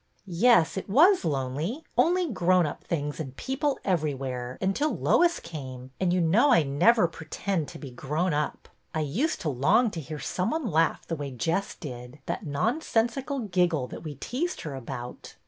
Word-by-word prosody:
Yes, 185 -2 +4
it 190 - -5
was 345 - +6
lonely. 150 - -2
Only 355 +1 +3
grown 185 -3 +3
up 150 - -5
things 145 -2 -3
and 135 -4 -5
people 275 +1 -1
everywhere, 135 -8 -2
until 195 +11 0
Lois 345 -1 +3
came, 130 -6 -8
and 185 -2 +2
you 180 - +2
know 200 - +4
I 230 - +6
never 175 +9 +4
pretend 165 +1 -3
to - - -9
be 140 -4 -8
grown 150 +8 -1
up. 150 0 -2 0.3
I 155 - +1
used 205 - -1
to 160 - -1
long 190 - +3
to 165 - -5
hear 155 +1 -6
some 180 +6 -2
one 315 0 -2
laugh 160 +1 +2
the 165 - -3
way 145 -2 -5
Jess 165 - -1
did, 125 -3 -8
that 185 - -4
nonsensical 240 - 0
giggle, 180 - +1
that - - -8
we 155 -3 -6
teased 270 - -3
her 150 - -5
about. 125 -1 -7
165 Hz, 175 wpm, -27 LUFS, 145-230 Hz, 0.3 s, was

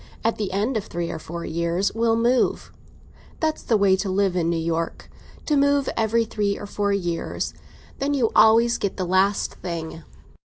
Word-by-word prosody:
At 225 - +1
the 205 -3 -3
end 215 +6 0
of 210 - -4
three 170 -1 -4
or 160 - -5
four 170 +2 -7
years 170 +4 -1
we'll 230 0 +2
move. 240 +2 +1 0.7
That's 315 -1 -1
the 225 - +2
way 200 -2 +4
to 195 +1 -2
live 190 -1 +1
in 170 -2 +1
New 170 - 0
York—to 165 - -4
move 285 -1 +3
every 225 +1 +1
three 205 -2 -1
or - - -7
four 205 0 -1
years. 175 -4 -2 0.5
Then 285 +1 0
you 240 -5 +1
always 230 +2 +5
get 200 - -2
the 185 - -1
last 190 +3 +1
thing. 165 -2 -5
200 Hz, 180 wpm, -23 LUFS, 175-230 Hz, 0.7 s, always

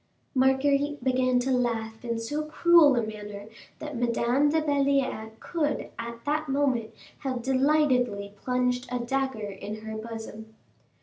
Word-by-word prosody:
Marguerite 275 +1 +2
began 255 -1 +2
to 265 +2 -1
laugh 225 -3 -1
in 235 -1 -2
so 290 +7 -3
cruel 310 -2 +5
a 235 - +1
manner 210 -1 -7 0.3
that 300 -2 -7
Madame 240 +4 +2
de 320 +2 +2
Belliere 280 -6 +1
could 300 -4 -2
at 235 0 -7
that 305 +1 -1
moment 265 -5 +1 0.3
have 255 -3 -3
delightedly 260 -7 +2
plunged 250 +2 -1
a 250 - 0
dagger 245 -3 -2
in 210 +3 -7
her 220 0 -5
bosom. 220 0 -8
250 Hz, 135 wpm, -27 LUFS, 225-280 Hz, 0.3 s, cruel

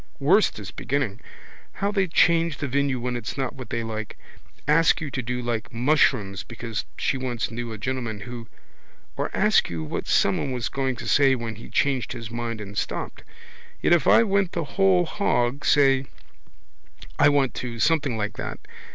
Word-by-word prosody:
Worst 185 +10 +3
is 100 -4 -7
beginning. 130 -7 -2 0.5
How 200 +1 -1
they 195 -2 +1
change 165 -2 +3
the 140 - -3
venue 140 -1 0
when 125 +1 -3
it's 120 +1 -5
not 135 -1 -2
what 130 -4 -9
they 115 -1 -2
like. 110 -1 -5 0.5
Ask 165 +2 +4
you 155 -4 -5
do 130 - -2
you 125 0 -2
like 120 -2 -3
mushrooms 115 -6 +2
because 115 -2 -5
she 140 - 0
once 125 -3 -3
knew 120 0 -5
a 110 - -6
gentleman 115 -2 -3
who. 120 -1 -8 0.7
Or - - -2
ask - - +3
you 80 -2 -4
what 75 - -4
someone 100 +7 +2
was 120 -4 -2
going 135 -2 -1
to - - -7
say 135 -2 +4
when 115 -2 -4
he 110 - -11
changed 135 -4 0
his 115 -3 -7
mind 115 -1 -4
and 100 -1 -8
stopped. - - -4 0.6
Yet - - +3
if 170 -6 +3
I - - +7
went 195 -4 +1
the 170 - -1
whole 185 +3 +3
hog, 140 -8 0
say: 135 -2 +4 1.1
I 145 - +7
want 140 -3 +2
to, 120 -1 -5
something 140 -2 +1
like 105 0 -3
that. - - -5
130 Hz, 180 wpm, -24 LUFS, 115-145 Hz, 1.1 s, I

